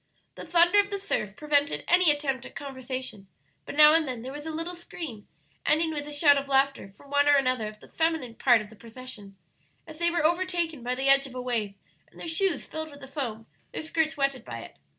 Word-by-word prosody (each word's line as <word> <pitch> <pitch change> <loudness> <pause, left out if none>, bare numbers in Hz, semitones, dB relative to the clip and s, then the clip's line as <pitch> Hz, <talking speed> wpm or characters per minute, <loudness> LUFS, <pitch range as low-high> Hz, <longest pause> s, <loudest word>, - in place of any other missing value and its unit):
The - - -10
thunder 345 +4 +5
of 405 0 +2
the 400 - -2
surf 215 - -3
prevented 290 -1 0
any 350 -1 +6
attempt 280 -4 +1
at - - -17
conversation, 260 -6 -6 0.4
but - - -6
now 300 0 +8
and 325 -2 +3
then 245 -3 -5
there 260 - -6
was 295 +2 -8
a - - -2
little 330 +3 -3
scream, 320 -10 -8 0.4
ending 320 +1 +2
with 290 -1 -4
a - - -7
shout 290 -1 +5
of 275 - -7
laughter 275 -6 +1
from 280 - -17
one 285 0 +3
or 290 - +6
another 255 -5 +1
of 215 0 -11
the - - -14
feminine 320 -7 -1
part 240 -1 +4
of 210 0 -11
the - - -13
procession, 225 -3 -11 0.5
as 315 -1 -12
they 340 0 +3
were 340 -2 0
overtaken 340 -3 0
by 250 +1 -1
the 265 +1 -1
edge 275 0 +6
of 255 - -12
a - - -4
wave 225 -5 -2 0.3
and - - -18
their - - -7
shoes 330 -1 0
filled 315 0 -6
with 285 -1 -14
the 270 - -9
foam, 240 -6 -5 0.3
their - - -4
skirts 315 0 -1
wetted 275 -2 0
by - - -7
it. - - -12
285 Hz, 230 wpm, -27 LUFS, 255-320 Hz, 0.5 s, now